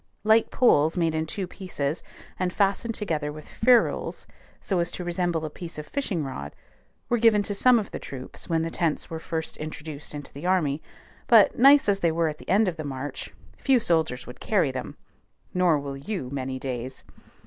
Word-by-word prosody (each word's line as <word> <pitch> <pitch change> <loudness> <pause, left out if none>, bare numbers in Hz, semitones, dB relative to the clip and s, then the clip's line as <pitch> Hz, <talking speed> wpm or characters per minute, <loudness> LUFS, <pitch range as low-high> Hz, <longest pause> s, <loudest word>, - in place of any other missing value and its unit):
Light 220 +1 +4
poles 160 - +3
made 165 -2 +2
in 160 0 -1
two 190 +4 -3
pieces, 170 -5 -4 0.4
and 185 -1 0
fastened 205 +4 0
together 155 -8 -2
with 155 0 -10
ferrules 245 +1 +2 0.3
so 190 -3 -1
as 170 0 0
to 180 - -6
resemble 175 -2 -1
a - - -3
piece 165 0 -8
of 150 - -5
fishing 200 - -2
rod, 130 - -6 0.5
were 240 - +1
given 220 -2 +5
to 205 - -2
some 250 +4 +5
of 210 -3 -3
the - - -5
troops 130 +5 -7
when 165 -1 +1
the 165 - -3
tents 165 -2 -1
were 160 - -4
first 160 0 -4
introduced 150 -1 -6
into 145 -2 -8
the 145 +6 -5
army; 160 -6 +1 0.5
but, 225 -4 +6
nice 275 +1 +7
as 200 -1 +2
they 170 -3 +2
were 165 0 +1
at 150 - -7
the - - -12
end 205 +3 +4
of 175 -2 -2
the 155 - -4
march, 140 0 -5 0.3
few 265 -3 +4
soldiers 160 - +1
would 125 - -11
carry 185 -10 +1
them, 130 -1 -6 0.6
nor 180 -4 +3
will 140 -1 -5
you 140 -2 -5
many 130 -1 -3
days. 130 -1 -5
165 Hz, 195 wpm, -26 LUFS, 145-200 Hz, 0.6 s, nice